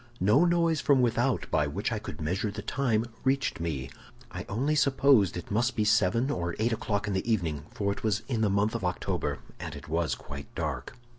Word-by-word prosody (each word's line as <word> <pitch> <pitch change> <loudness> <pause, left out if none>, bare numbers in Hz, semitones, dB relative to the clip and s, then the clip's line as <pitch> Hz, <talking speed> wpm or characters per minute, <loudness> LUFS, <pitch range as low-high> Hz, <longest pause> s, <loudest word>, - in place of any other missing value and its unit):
"No 110 - +5
noise 170 -3 +2
from 140 -4 +4
without 120 +1 +1
by - - +2
which - - -2
I - - -1
could 75 - -8
measure 95 +7 -1
the 105 0 -6
time 120 -5 +1 0.2
reached 135 +1 +1
me; 75 -6 -3 0.4
I - - -6
only 130 +9 0
supposed 135 - +4
it 90 - -7
must 120 +4 +1
be 110 - +1
seven 110 +5 +3
or 85 -1 -2
eight 115 +2 +1
o'clock 105 -2 -1
in 100 - -1
the 95 +5 -1
evening, 80 -9 -1
for 100 -1 -1
it 100 - -5
was 105 -1 0
in 120 -5 -1
the 105 - +3
month 100 +2 +1
of 115 -4 -3
October 90 0 -2 0.2
and - - -6
it - - -10
was 80 +1 0
quite 70 0 -9
dark. - - -3
110 Hz, 210 wpm, -29 LUFS, 90-130 Hz, 0.4 s, No